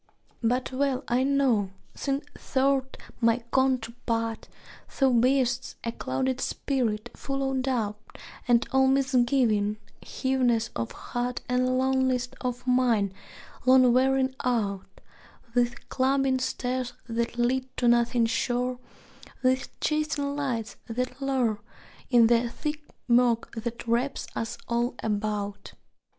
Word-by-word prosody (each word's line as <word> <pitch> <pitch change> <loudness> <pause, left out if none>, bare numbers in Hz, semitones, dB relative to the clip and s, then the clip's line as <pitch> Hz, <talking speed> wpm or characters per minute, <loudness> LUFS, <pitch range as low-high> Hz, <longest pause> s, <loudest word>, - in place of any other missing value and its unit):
But 250 +3 0
well 270 0 0
I 245 +2 +2
know 265 -7 +2 0.2
since 275 +1 -2 0.3
thou 275 +1 +4
'rt 265 0 -8 0.2
my 230 +1 +3
counterpart 230 -3 0 0.5
Thou 270 -2 +5
bear'st 250 +1 +2
a 230 - -1
clouded 260 +1 -2
spirit; 240 -4 -1
full 275 -1 -2
of 265 -1 0
doubt 220 -5 -3 0.3
And 240 -1 +4
old 265 0 +5
misgiving, 245 -6 +2 0.2
heaviness 250 -4 0
of 115 -1 -3
heart 245 0 -4
And 255 +1 +1
lonliness 260 -1 +1
of 250 -1 -3
mind; 240 -6 +2 0.5
long 255 -1 +7
wearied 260 +1 +2
out 205 -6 0 0.7
With 245 +1 0
climbing 265 0 +2
stairs 255 -1 -2
that 235 0 -2
lead 255 +2 +1
to 245 - +2
nothing 235 0 +3
sure, 245 +2 -1 0.6
With 255 +1 0
chasing 305 -2 0
lights 245 -6 -3
that 250 +3 -3
lure, 250 -6 0 0.5
In 240 -3 +6
the 235 +1 +3
thick 300 +4 -4 0.3
murk 240 -1 +3
that 235 +1 -5
wraps 245 +4 0
us 225 - -3
all 240 +1 0
about. 205 -1 -2
250 Hz, 120 wpm, -27 LUFS, 235-265 Hz, 0.7 s, long